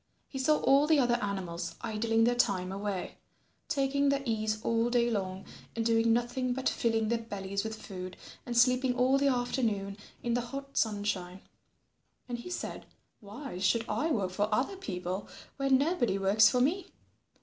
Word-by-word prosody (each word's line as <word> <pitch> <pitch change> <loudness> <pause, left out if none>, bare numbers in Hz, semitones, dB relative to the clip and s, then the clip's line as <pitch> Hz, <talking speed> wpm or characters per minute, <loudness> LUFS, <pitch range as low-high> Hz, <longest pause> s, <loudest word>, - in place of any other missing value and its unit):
He 270 - -6
saw 300 +3 +3
all 280 +2 +5
the 315 -1 +5
other 245 -3 +3
animals 180 -4 -3
idling 225 0 +1
their 240 +1 +4
time 195 -6 +1
away, 200 -1 -4 0.5
taking 280 -2 +1
their 280 0 +1
ease 215 -2 -1
all 230 +1 +2
day 240 -1 +2
long, 190 -3 -3 0.3
and 225 -1 -1
doing 230 0 +3
nothing 245 +2 0
but 260 +1 -2
filling 225 -2 +1
their 235 0 +1
bellies 200 -3 -4
with 220 0 -5
food, 185 -2 -7 0.3
and 240 -1 -3
sleeping 250 +1 +4
all 260 +2 +3
the 280 - +3
afternoon 230 -6 0 0.3
in 235 - 0
the 245 - +1
hot 275 +3 -7
sunshine. 200 -4 -1 0.9
And 240 -1 -4
he 240 - -8
said, 360 - -5 0.3
"Why 210 0 -8
should 225 +4 +2
I 315 - 0
work 200 - 0
for 205 +3 0
other 255 - +1
people 185 - -4 0.3
when 275 -1 +4
nobody 275 - +1
works 205 +2 +5
for 250 - +1
me? 345 +8 +1
230 Hz, 170 wpm, -30 LUFS, 200-260 Hz, 0.9 s, all